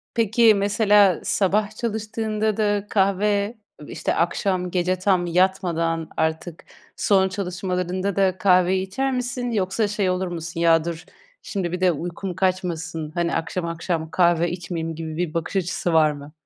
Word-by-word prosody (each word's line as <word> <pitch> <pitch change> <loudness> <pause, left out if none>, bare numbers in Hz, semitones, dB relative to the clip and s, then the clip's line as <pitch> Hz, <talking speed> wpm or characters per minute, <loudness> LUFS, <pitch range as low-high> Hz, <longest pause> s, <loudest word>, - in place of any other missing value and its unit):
Peki 225 0 +4
mesela 200 -2 +3
sabah 205 +2 +1
çalıştığında 215 -1 -2
da 205 -2 +1
kahve 200 +2 +1 0.3
işte - - -2
akşam 180 +1 0
gece 180 0 0
tam 185 -2 +2
yatmadan 170 -2 0
artık 160 +1 -2 0.3
son 190 -2 +3
çalışmalarında 185 0 -2
da 190 -2 +2
kahveyi 185 0 +3
içer 270 +8 -1
misin 250 -1 -2
yoksa 205 0 0
şey 205 -2 0
olur 185 +1 -1
musun 170 -1 -6
ya 165 -1 +4
dur, 170 -1 -5 0.4
şimdi 185 -5 -3
bir 180 +1 -4
de 185 -1 +4
uykum 175 +3 -5
kaçmasın, 170 -4 -2
hani 170 -1 0
akşam 170 +2 -2
akşam 165 -1 -3
kahve 175 -1 +2
içmeyeyim 170 -2 -4
gibi 160 -1 -6
bir 175 -3 -2
bakış 165 +3 -3
açısı 175 -2 -1
var 155 -1 +5
mı? 145 0 -10
185 Hz, 145 wpm, -23 LUFS, 170-200 Hz, 0.4 s, var